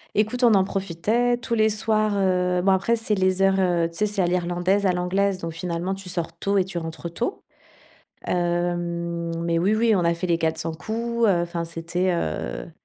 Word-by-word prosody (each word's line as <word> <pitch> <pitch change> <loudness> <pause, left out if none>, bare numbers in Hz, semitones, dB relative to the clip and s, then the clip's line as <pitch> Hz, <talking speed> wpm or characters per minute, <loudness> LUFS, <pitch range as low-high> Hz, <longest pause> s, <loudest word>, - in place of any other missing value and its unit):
Écoute, 220 +4 +1
on 230 -3 +6
en 190 - +4
profitait 200 +6 0
tous 240 -1 -4
les 220 -1 +4
soirs, 215 0 +1
heu, 180 -2 +1
bon 195 - +4
après, 195 +5 +2
c'est 225 -2 -2
les 185 -1 +2
heures, 195 0 +3
heu, 175 -3 +2
tu - - -17
sais, 210 - +2
c'est 200 -2 0
à - - +3
l'irlandaise, 180 +3 +1
à - - +4
l'anglaise, 185 +2 0
donc 165 -2 -5
finalement, 175 +2 -3
tu 195 -1 -8
sors 170 -2 -3
tôt 200 +3 0
et 190 - +3
tu 180 -2 -4
rentres 165 +1 -6
tôt. 240 - -3 0.8
Hem, 175 -1 -1
mais 170 0 +1
oui, 190 +5 +2
oui, 225 0 +3
on 180 - +1
a 170 - +3
fait 170 +2 -3
les 170 -1 +2
quatre 160 -1 0
cents 160 0 -3
coups, 230 +8 -1
heu, 185 -5 +3
enfin 170 -1 -3
c'était, 170 +2 -2
heu, - - -3
180 Hz, 210 wpm, -24 LUFS, 170-205 Hz, 0.8 s, on